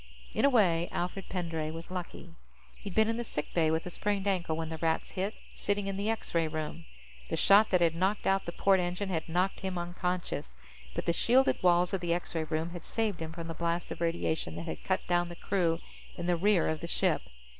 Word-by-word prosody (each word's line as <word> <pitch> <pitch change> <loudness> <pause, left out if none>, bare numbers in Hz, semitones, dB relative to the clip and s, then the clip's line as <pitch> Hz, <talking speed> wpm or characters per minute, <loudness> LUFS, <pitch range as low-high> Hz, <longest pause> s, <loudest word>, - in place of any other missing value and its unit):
In - - +3
a - - +7
way, 175 -9 +3
Alfred 180 +2 -3
Pendray 165 -4 -2
was 165 +2 -8
lucky. 175 -2 -6 0.4
He'd 200 -3 -8
been 220 0 +5
in 225 0 0
the 240 - -1
sick 150 -9 -4
bay 160 -2 +3
with 160 +1 0
a 180 - -5
sprained 205 +1 -1
ankle 175 -5 +1
when 160 0 -3
the 160 -1 -5
Rats 160 0 0
hit, 195 +3 -2 0.2
sitting 205 0 -1
in 195 0 -2
the 200 +2 -1
X 225 - -3
ray 165 -1 +3
room. 155 +1 -4 0.4
The - - -1
shot 205 +2 +6
that 180 - +3
had 165 -1 +4
knocked 190 +5 0
out 195 0 +2
the 170 - -3
port 195 +2 +3
engine 180 +3 -2
had 165 -3 -2
knocked 180 +3 +1
him 190 -1 -3
unconscious, 175 - -3 0.4
but - - -2
the 170 - +2
shielded 255 +9 +3
walls 175 0 +4
of 190 - 0
the 170 -1 +1
X 175 - -5
ray 160 -1 -1
room 160 +2 -2
had 175 -2 -7
saved 220 -5 -1
him 160 -1 -4
from 165 0 -6
the 165 - -4
blast 170 +1 -1
of - - -6
radiation 165 - -1
that 85 0 -5
had 80 - -5
cut 190 +1 0
down 175 0 +1
the 175 - -7
crew 170 -3 +1 0.4
in 175 - -4
the 175 0 +3
rear 195 +1 +3
of 155 0 -1
the 170 - -5
ship. - - +1
175 Hz, 235 wpm, -31 LUFS, 165-195 Hz, 0.4 s, a